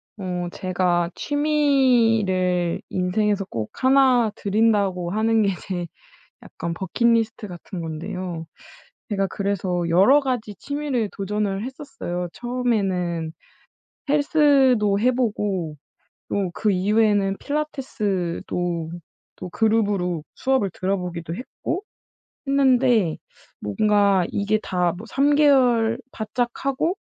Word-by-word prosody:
어 180 -3 -3
제가 180 -2 0
취미를 230 - +2
인생에서 200 +2 0
꼭 110 -2 -3
1 260 -4 +4
들인다고 200 -4 +1
하는 220 +2 +2
게 200 - +2 0.2
제 175 -2 -3 0.6
약간 170 - -6
버킷리스트 225 +4 0
같은 175 +1 -8
건데요. 170 +1 -5 0.6
제가 195 -1 +1
그래서 190 -3 -1
여러 200 +12 +6
가지 250 -6 -3
취미를 285 -5 -2
도전을 200 0 -2
했었어요. 260 - -5
처음에는 195 -10 -1 0.8
헬스도 275 -8 +3
해 250 +3 +3
보고 205 -10 -1 0.5
또 195 -3 -1
그 215 - +1
이후에는 205 0 +2
필라테스도 190 - -2 0.5
또 185 - -7
그룹으로 200 -6 +1
수업을 260 -7 +1
들어 190 +2 0
보기도 170 -2 -5
했고 305 - -5 0.6
했는데 255 - +3 0.4
뭔가 200 - +2
이게 205 +1 0
다 180 -2 0
뭐 215 - -9
3 285 +4 +2
개월 245 -6 +4
바짝 240 +2 -2 0.2
하고 295 +7 0
210 Hz, 225 characters per minute, -23 LUFS, 180-250 Hz, 0.8 s, 여러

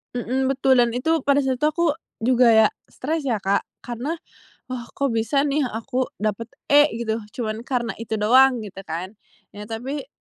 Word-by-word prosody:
Mhm, 260 +2 -1
betul 265 -1 +3
dan 240 0 +2
itu 320 +6 +1
pada 280 0 +4
saat 260 -2 -1
itu 300 - +3
aku 340 +3 0 0.4
juga 250 0 +4
ya 220 -1 +7 0.2
stres 300 +1 -3
ya, 235 - +2
Kak, 200 +1 +1 0.2
karena, 245 +7 -3 0.6
"Wah, 245 -2 -5
kok 275 -3 0
bisa 230 +5 +1
nih 285 -2 +1
aku 250 +3 -2
dapat 215 +2 -2 0.2
E" 290 +1 +7
gitu, 230 -1 -2 0.2
"cuman 220 -2 -3
karena 240 -4 -1
itu 225 -1 -3
doang." 245 +2 +4
gitu 195 -2 -9
kan. 175 +4 -4 0.4
Iya, 210 0 -9
tapi 265 +6 -5
245 Hz, 175 wpm, -23 LUFS, 225-275 Hz, 0.6 s, ya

